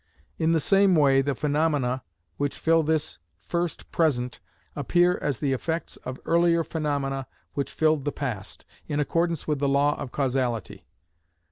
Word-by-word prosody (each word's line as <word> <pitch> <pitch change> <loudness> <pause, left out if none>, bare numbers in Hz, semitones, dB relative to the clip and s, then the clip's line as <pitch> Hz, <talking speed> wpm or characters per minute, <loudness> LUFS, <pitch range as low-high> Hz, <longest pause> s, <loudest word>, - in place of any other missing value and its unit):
In 160 0 +2
the 165 - +3
same 195 +3 +4
way, 135 -3 +5
the 140 0 -1
phenomena 145 -3 0 0.4
which 145 -1 -2
fill 165 0 +3
this 155 0 -1 0.2
first 170 - -3
present 125 -7 0 0.4
appear 175 +5 +2
as 140 -4 -1
the 140 -3 +1
effects 160 +5 -3
of 130 0 -7
earlier 170 0 +3
phenomena 140 -4 -2 0.3
which 140 - -2
filled 155 -3 +1
the 145 - 0
past, 120 -11 -5 0.2
in 150 - -1
accordance 165 +2 0
with 150 -2 0
the 140 0 +1
law 145 +1 +3
of 125 - -5
causality. 125 -6 -2
145 Hz, 150 wpm, -26 LUFS, 135-165 Hz, 0.4 s, way